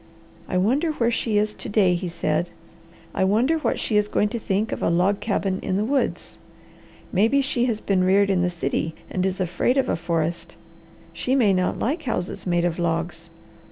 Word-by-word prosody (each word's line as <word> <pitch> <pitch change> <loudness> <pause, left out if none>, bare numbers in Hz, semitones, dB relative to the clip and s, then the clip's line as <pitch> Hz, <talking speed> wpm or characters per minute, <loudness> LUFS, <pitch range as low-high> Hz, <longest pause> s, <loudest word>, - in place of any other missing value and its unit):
"I 185 - 0
wonder 270 - +1
where 235 -5 +1
she 225 -2 0
is 210 0 +1
to - - -7
day," 205 -4 +3
he 175 0 -2
said. 170 0 -1 0.6
"I - - 0
wonder 235 +12 +2
what - - -1
she 215 - +1
is 210 0 +2
going 210 0 +1
to 235 - -3
think 205 +1 -1
of - - -4
a - - +2
log 180 +4 +2
cabin 195 -3 -1
in 185 - -2
the 205 +2 +1
woods. 275 +3 -1 0.7
Maybe 225 +9 +3
she 260 -3 +1
has 230 -4 -1
been 190 -2 +1
reared 195 +2 +3
in 185 -2 +2
the 180 - +2
city 160 -1 -2 0.2
and 185 - -1
is 190 0 -3
afraid 185 +8 0
of 270 - +1
a - - +1
forest. 165 0 -2 0.6
She 260 - 0
may 220 -7 +4
not 185 -1 0
like 300 +8 -1
houses 230 - -3
made 175 -1 +2
of 175 0 -1
logs. 170 0 -2
195 Hz, 200 wpm, -23 LUFS, 175-230 Hz, 0.7 s, may